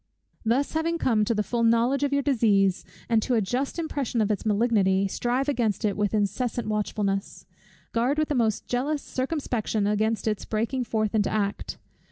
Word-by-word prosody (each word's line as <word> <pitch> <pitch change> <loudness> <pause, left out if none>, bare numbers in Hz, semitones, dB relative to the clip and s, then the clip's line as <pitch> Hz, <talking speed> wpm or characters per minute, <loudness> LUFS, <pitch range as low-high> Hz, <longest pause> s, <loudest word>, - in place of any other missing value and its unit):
Thus 240 +5 +1
having 330 +1 0
come 225 -9 +2
to 230 - 0
the 210 - +1
full 235 +2 -2
knowledge 235 +4 +3
of 285 -1 +1
your 280 0 +1
disease, 205 -8 +2 0.2
and 225 -2 +3
to 250 +2 0
a - - +4
just 250 - -2
impression 285 -7 -2
of 215 -1 +2
its 210 +1 -2
malignity, 200 -3 +2
strive 245 +7 -1
against 235 -6 0
it 205 - +1
with 210 0 0
incessant 215 +3 -1
watchfulness. 205 -2 -2 0.5
Guard 245 +5 +1
with 310 0 +1
the - - +1
most 225 -5 0
jealous 280 +4 -1
circumspection 255 -6 -2
against 215 +2 0
its 210 -2 -1
breaking 235 +4 -1
forth 215 -2 -1
into 210 -2 +2
act. 205 -1 -2
230 Hz, 180 wpm, -26 LUFS, 210-260 Hz, 0.5 s, a